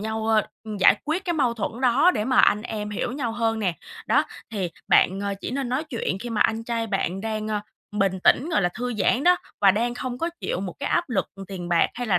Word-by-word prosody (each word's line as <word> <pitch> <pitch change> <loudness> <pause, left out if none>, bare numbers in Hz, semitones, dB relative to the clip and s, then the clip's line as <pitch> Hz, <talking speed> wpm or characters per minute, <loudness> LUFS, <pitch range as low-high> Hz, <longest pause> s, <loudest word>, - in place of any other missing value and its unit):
nhau, 220 +1 -3
ơ, 220 -1 +3 0.3
giải - - +7
quyết 315 +5 -1
cái 345 - 0
mâu 260 -7 +1
thuẫn 225 +2 -4
đó 265 +8 +5
để 210 - -1
mà 255 +1 +1
anh 210 - +5
em 210 -1 -4
hiểu 210 +4 -2
nhau 255 -5 -2
hơn 225 -1 0
nè, 185 -6 0 0.3
đó, - - +3 0.3
thì 190 -5 -2 0.2
bạn, 190 +2 +4
ờ, 200 0 -1
chỉ - - -4
nên 265 0 -2
nói 260 +6 -1
chuyện 235 -9 -3
khi 240 - -5
mà 220 - -1
anh 225 0 +2
trai 230 -1 -2
bạn 195 -2 -1
đang, 215 0 -3
ơ, 210 -1 -1 0.4
bình 195 -2 +1
tĩnh, 300 - +4
gọi 305 - +2
là, 175 - +3
thư 245 0 -3
giãn 245 - +1
đó, 360 0 +6 0.2
và 195 -1 +7
đang 235 +4 0
không 250 0 -4
có 335 - 0
chịu 180 - -2
một 185 -3 -4
cái 280 - -2
áp 345 -4 +1
lực 190 -6 0 0.2
tiền 180 -3 -6
bạc 170 -1 +4
hay 245 0 -4
là 190 -5 +3
225 Hz, 250 wpm, -24 LUFS, 200-250 Hz, 0.4 s, giải